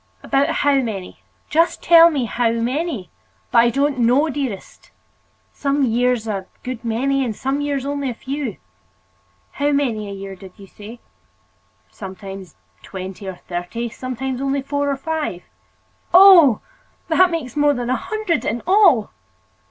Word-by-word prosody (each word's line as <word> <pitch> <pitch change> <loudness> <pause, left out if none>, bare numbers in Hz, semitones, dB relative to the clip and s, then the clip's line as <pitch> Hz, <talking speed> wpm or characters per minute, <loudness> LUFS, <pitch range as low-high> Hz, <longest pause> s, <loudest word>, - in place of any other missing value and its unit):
"About 275 +1 +1
how 280 -1 +2
many? 200 -7 -6 0.3
Just 335 +2 +1
tell 335 0 +8
me 285 -6 -1
about 230 - -5
how 240 -2 +2
many." 245 - -3 0.4
"But - - +2
I 235 +1 +5
don't 275 +2 0
know, 250 +7 +3
dearest. 260 -8 -6 0.6
Some 280 0 0
years 240 -1 0
a 195 -3 -4 0.2
good 250 -2 -6
many, 265 +4 0
and 230 -4 -3
some 270 +5 -2
years 285 -2 -2
only 280 -1 -2
a 240 - -5
few." 265 -4 -5 0.9
"How 290 +1 0
many 235 -8 -1
a - - -6
year, 195 0 -7
did 190 -1 -13
you 200 - -12
say?" 215 +4 -12 0.9
"Sometimes 190 - -9 0.3
twenty 190 +1 -8
or 190 - -5
thirty, 180 +7 -4
sometimes 255 +2 -5
only 275 0 -1
four 285 +1 -1
or 275 - -1
five." 300 - -4 0.7
"Oh! 355 - +8 0.5
that 360 +2 +4
makes 310 -8 -4
more 290 -1 +3
than 245 0 -3
a - - +2
hundred 430 - -2
in 230 +2 -3
all!" 365 - +4
255 Hz, 150 wpm, -20 LUFS, 220-285 Hz, 0.9 s, tell